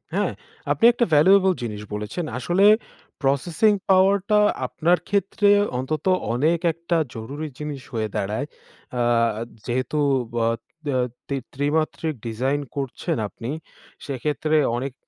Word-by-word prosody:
হ্যাঁ, -, -, +1 dB, 0.4 s
আপনি 230 Hz, -, +2 dB
একটা 240 Hz, -, +2 dB
valuable 190 Hz, +5 st, +6 dB
জিনিস 105 Hz, -3 st, -4 dB
বলেছেন। 105 Hz, +11 st, -4 dB
আসলে 175 Hz, +9 st, +2 dB, 0.6 s
processing 160 Hz, +10 st, +2 dB
power 190 Hz, +1 st, +5 dB
টা 210 Hz, 0 st, +5 dB, 0.3 s
আপনার 175 Hz, +2 st, +2 dB
ক্ষেত্রে 200 Hz, +1 st, +2 dB, 0.3 s
অন্তত 145 Hz, +3 st, -3 dB, 0.3 s
অনেক 155 Hz, +7 st, +2 dB
একটা 170 Hz, +1 st, -1 dB, 0.2 s
জরুরি 140 Hz, +8 st, -5 dB
জিনিস 150 Hz, -3 st, -5 dB
হয়ে 110 Hz, -2 st, -1 dB
দাঁড়ায়। 105 Hz, +6 st, -1 dB, 0.5 s
আ -, -, +2 dB, 0.6 s
যেহেতু 130 Hz, +4 st, -1 dB, 0.4 s
ব -, -, -7 dB
আ -, -, +2 dB, 0.8 s
ত্রি 140 Hz, -, -2 dB, 0.2 s
ত্রিমাত্রিক 155 Hz, +2 st, -1 dB
design 130 Hz, +6 st, -1 dB
করছেন 135 Hz, -4 st, -3 dB
আপনি, 115 Hz, +4 st, -8 dB, 0.6 s
সেক্ষেত্রে 150 Hz, +3 st, -1 dB, 0.2 s
অনেক 130 Hz, +2 st, -3 dB
150 Hz, 120 wpm, -23 LUFS, 130-175 Hz, 0.8 s, valuable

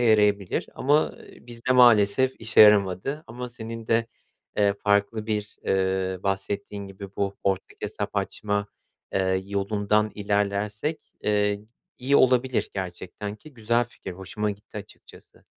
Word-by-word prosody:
yarayabilir 105 Hz, -4 st, +3 dB
ama, 145 Hz, +3 st, +3 dB
ııı, -, -, -15 dB
bizde 120 Hz, +1 st, -1 dB
maalesef 120 Hz, +1 st, +6 dB
işe 110 Hz, 0 st, +3 dB
yaramadı 105 Hz, -, +5 dB
ama 125 Hz, +2 st, -6 dB
senin 115 Hz, -1 st, -8 dB
de, 115 Hz, 0 st, +2 dB, 0.5 s
eee, 100 Hz, -1 st, +4 dB
farklı 100 Hz, +2 st, +1 dB
bir, 105 Hz, -1 st, -3 dB
eee, 95 Hz, -1 st, 0 dB
bahsettiğin 100 Hz, +1 st, -3 dB
gibi 95 Hz, 0 st, -10 dB
bu 100 Hz, 0 st, -1 dB
ortak 95 Hz, -1 st, -1 dB
hesap -, -, -4 dB
açma, 105 Hz, -1 st, -1 dB, 0.5 s
eee, 95 Hz, 0 st, +1 dB
yolundan 105 Hz, +1 st, +1 dB
ilerlersek, 105 Hz, +7 st, -2 dB
eee, 105 Hz, -1 st, +1 dB, 0.4 s
iyi 135 Hz, +3 st, +3 dB
olabilir 130 Hz, 0 st, +3 dB
gerçekten 95 Hz, +2 st, -5 dB
ki 150 Hz, +4 st, -16 dB
güzel 120 Hz, +1 st, +1 dB
fikir 95 Hz, -5 st, -9 dB
hoşuma 100 Hz, +3 st, -3 dB
gitti 105 Hz, +1 st, -11 dB
açıkçası. 100 Hz, -, -15 dB
105 Hz, 125 wpm, -25 LUFS, 100-115 Hz, 0.5 s, maalesef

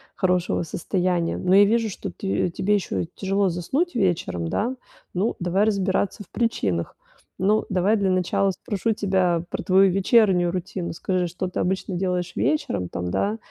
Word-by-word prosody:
хорошего 180 Hz, -3 st, +1 dB
состояния. 175 Hz, +1 st, -1 dB
Но 185 Hz, +1 st, +2 dB
я 200 Hz, -, +8 dB
вижу, 225 Hz, +1 st, +1 dB
что -, -, -6 dB
ты 195 Hz, -2 st, -1 dB
тебе 200 Hz, +4 st, 0 dB
ещё 195 Hz, -3 st, -2 dB
тяжело 195 Hz, 0 st, +1 dB
заснуть 260 Hz, -, -1 dB
вечером, 170 Hz, -, 0 dB
да. 245 Hz, +5 st, -1 dB, 0.4 s
Ну, 195 Hz, +6 st, 0 dB
давай 180 Hz, +3 st, +1 dB
разбираться 200 Hz, 0 st, 0 dB
в -, -, -25 dB
причинах. 100 Hz, -, -1 dB, 0.4 s
Ну, 210 Hz, +3 st, +2 dB
давай 195 Hz, +3 st, +2 dB
для 195 Hz, -3 st, +1 dB
начала 185 Hz, +2 st, +1 dB
спрошу 205 Hz, +4 st, -2 dB
тебя 185 Hz, -4 st, +1 dB
про -, -, -4 dB
твою 190 Hz, 0 st, +5 dB
вечернюю 190 Hz, -2 st, +3 dB
рутину. 185 Hz, -1 st, -4 dB
Скажи, 180 Hz, +2 st, -1 dB
что 180 Hz, +2 st, -4 dB
ты 180 Hz, -, -4 dB
обычно 190 Hz, 0 st, -1 dB
делаешь 180 Hz, -1 st, -1 dB
вечером, 90 Hz, -, 0 dB
там, 90 Hz, 0 st, -4 dB
да, 210 Hz, +3 st, 0 dB
190 Hz, 160 wpm, -24 LUFS, 175-205 Hz, 0.4 s, я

